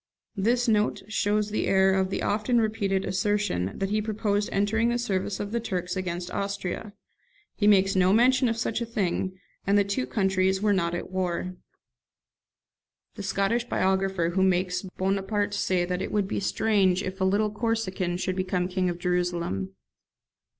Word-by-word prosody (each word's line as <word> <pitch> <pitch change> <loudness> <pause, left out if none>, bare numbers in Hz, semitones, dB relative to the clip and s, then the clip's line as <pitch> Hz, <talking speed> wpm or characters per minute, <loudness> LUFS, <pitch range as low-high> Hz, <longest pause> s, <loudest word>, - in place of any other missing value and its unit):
This 240 +5 +1
note 215 -2 +1
shows 210 0 0
the 215 - -1
error 190 0 +4
of 190 -1 +1
the - - -2
often 220 +4 +1
repeated 205 -3 0
assertion, 190 - -1
that 195 0 -2
he 215 0 +1
proposed 210 -1 -1
entering 220 +4 +1
the 240 - +1
service 200 -4 -2
of 205 0 -4
the 235 - 0
Turks 180 -5 -3
against 180 -1 -4
Austria. 200 +1 -4 0.6
He 205 - +1
makes 195 -2 +4
no 185 0 +4
mention 250 +3 +4
of 225 - -1
such 225 +1 -1
a - - -1
thing; 190 -3 -1 0.3
and 200 +1 +4
the 205 - +5
two 200 -11 -2
countries 190 +5 +1
were 205 0 +2
not 170 -3 0
at 175 - -6
war. 185 -1 -2 1.6
[The - - -8
Scottish 200 +4 0
biographer 190 -4 +1
makes 185 -1 +2 0.2
Bonaparte 195 +2 0
say 180 -3 +1
that 180 +1 -2
it - - -4
would 205 -2 +1
be - - -2
strange 195 -3 +2
if 190 +1 -5
a - - +3
little 205 +3 +2
Corsican 210 -5 -1
should 185 0 -2
become 185 -1 -1
King 185 0 0
of 175 - -3
Jerusalem. 175 - -1
195 Hz, 165 wpm, -26 LUFS, 185-210 Hz, 1.6 s, the